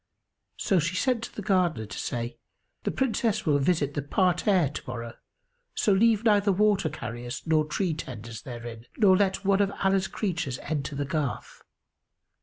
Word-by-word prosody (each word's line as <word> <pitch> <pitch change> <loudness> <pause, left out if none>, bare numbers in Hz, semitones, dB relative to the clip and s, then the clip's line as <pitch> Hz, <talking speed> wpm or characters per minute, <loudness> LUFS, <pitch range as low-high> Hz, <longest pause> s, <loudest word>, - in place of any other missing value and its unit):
So 190 - +2
she 170 +3 -1
sent 250 +3 +1
to - - -13
the 210 - -5
Gardener 180 - +1
to 105 - -8
say, 120 0 -4 0.5
"The - - +2
Princess 225 -4 0
will 145 -3 +3
visit 145 -1 +1
the 145 - -1
parterre 180 - +2
to 145 - -7
morrow, 115 -1 -5 0.6
so 210 - +2
leave 220 +2 +4
neither 205 -2 +4
water 200 -3 +2
carriers 120 -4 -6
nor 155 -1 +3
tree 170 +3 -1
tenders 115 -7 -7
therein, 120 -2 -8
nor 195 -4 +6
let 195 0 +1
one 195 0 +4
of 200 -1 +2
Allah's 195 0 +2
creatures 175 - -2
enter 145 -1 -3
the 140 0 -1
garth." 140 -2 -3
170 Hz, 165 wpm, -27 LUFS, 135-200 Hz, 0.6 s, nor